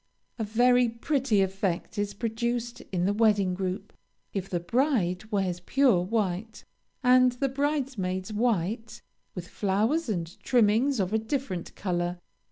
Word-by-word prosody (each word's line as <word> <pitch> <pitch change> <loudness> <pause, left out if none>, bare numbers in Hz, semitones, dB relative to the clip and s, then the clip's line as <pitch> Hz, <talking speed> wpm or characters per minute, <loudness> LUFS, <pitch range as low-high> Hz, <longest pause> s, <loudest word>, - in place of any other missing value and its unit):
A - - 0
very 245 +3 +3
pretty 235 -3 +1
effect 190 +1 -2
is 205 0 -2
produced 235 +2 -2
in 180 -2 0
the 200 - +2
wedding 205 -4 +3
group, 190 +2 -4 0.4
if 195 -1 -3
the 175 - -1
bride 215 - 0
wears 190 -4 0
pure 240 0 +3
white, 210 +1 -2 0.4
and 250 0 +5
the 275 +3 -1
bridesmaids 255 -9 -2
white, 220 0 -1 0.3
with 180 -2 -6
flowers 220 - 0
and 170 -4 -3
trimmings 240 +3 +3
of 190 +1 0
a 220 - +3
different 220 - -4
color. 175 -2 -2
215 Hz, 135 wpm, -27 LUFS, 185-245 Hz, 0.4 s, and